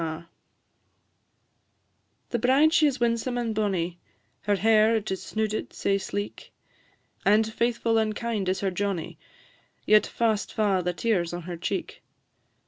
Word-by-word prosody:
The 240 - 0
bride 275 +7 +4
she 310 -3 +5
is 275 -3 -2
winsome 235 +1 0
and 235 -2 -1
bonnie, 185 -5 -1 0.4
Her 205 0 +1
hair 220 +3 +4
it 215 -2 -2
is 190 - -3
snooded 215 0 -3
sae 195 0 0
sleek; 205 +1 -5 0.7
And 210 +2 +4
faithful 230 -1 +1
and 215 -1 0
kind 220 -5 -2
is 190 - -1
her 195 -1 0
Johnnie, 190 -3 -3 0.7
Yet 215 0 +5
fast 220 -3 0
fa' 205 -4 +2
the 180 0 -1
tears 175 -4 0
on 175 0 -5
her 175 +1 -6
cheek. 170 - -4
215 Hz, 135 wpm, -26 LUFS, 195-230 Hz, 0.7 s, she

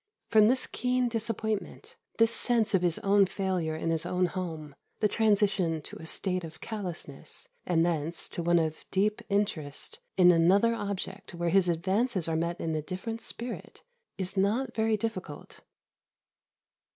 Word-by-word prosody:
From 215 -1 +7
this 255 +3 +2
keen 250 -1 0
disappointment, 225 - -3 0.2
this 225 0 +4
sense 225 -3 +2
of 190 - +4
his 175 -2 +2
own 200 0 +5
failure 180 -5 -1
in 165 +1 -1
his 165 -1 0
own 180 +1 +1
home, 165 -5 -5 0.3
the 215 - +4
transition 200 -6 +2
to - - -9
a 160 - -8
state 185 +1 -1
of 160 -1 -9
callousness, 180 -10 -6 0.2
and 170 -2 +3
thence, 165 -1 0
to - - -4
one 175 +1 +3
of 160 -1 -1
deep 210 +2 +1
interest 175 -8 -2 0.2
in 180 -1 +8
another 190 +7 +4
object 200 -3 -5
where 170 0 -1
his 180 0 +4
advances 190 +3 0
are 165 - 0
met 170 +2 -1
in 160 - -2
a 155 - -1
different 195 +8 -5
spirit, 240 +1 -5 0.3
is 190 +1 -3
not 225 +6 +1
very 220 -1 +1
difficult. 190 -8 -5
190 Hz, 155 wpm, -29 LUFS, 170-220 Hz, 0.3 s, in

